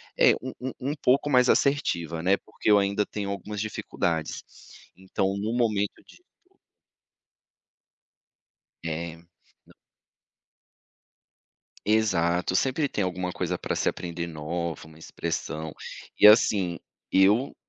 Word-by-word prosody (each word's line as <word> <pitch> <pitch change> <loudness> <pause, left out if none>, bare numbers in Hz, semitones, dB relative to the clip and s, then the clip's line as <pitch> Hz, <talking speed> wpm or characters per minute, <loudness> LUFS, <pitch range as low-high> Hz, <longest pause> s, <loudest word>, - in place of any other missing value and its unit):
é - - +6
um 130 - -6
um 130 +1 -3 0.2
um - - -1
pouco 140 +3 +3
mais 125 -1 +5
assertiva, 85 - +1
né. 95 +3 +3
Porque 110 - -4
eu 105 - +7
ainda 100 +1 +1
tenho 100 -1 -4
algumas 105 +1 -5
dificuldades. 90 -6 -2 0.5
Então, 95 +1 -2
no 105 +3 -2
momento 110 -4 0
de - - -18 0.3
o - - -35 2.3
É. 80 0 -4 0.5
Não - - -20 2.1
Exato, 90 -5 +2
sempre 135 +5 +1
tem 105 - -1
alguma 90 0 -3
coisa 90 0 -2
pra - - -3
se - - +1
aprender 85 -1 -4
nova, 80 0 -4
uma 80 0 -16
expressão. 80 -1 -4 0.5
E - - +8
assim, 100 -5 +5 0.3
eu 105 +8 +3
95 Hz, 120 wpm, -26 LUFS, 85-110 Hz, 2.3 s, E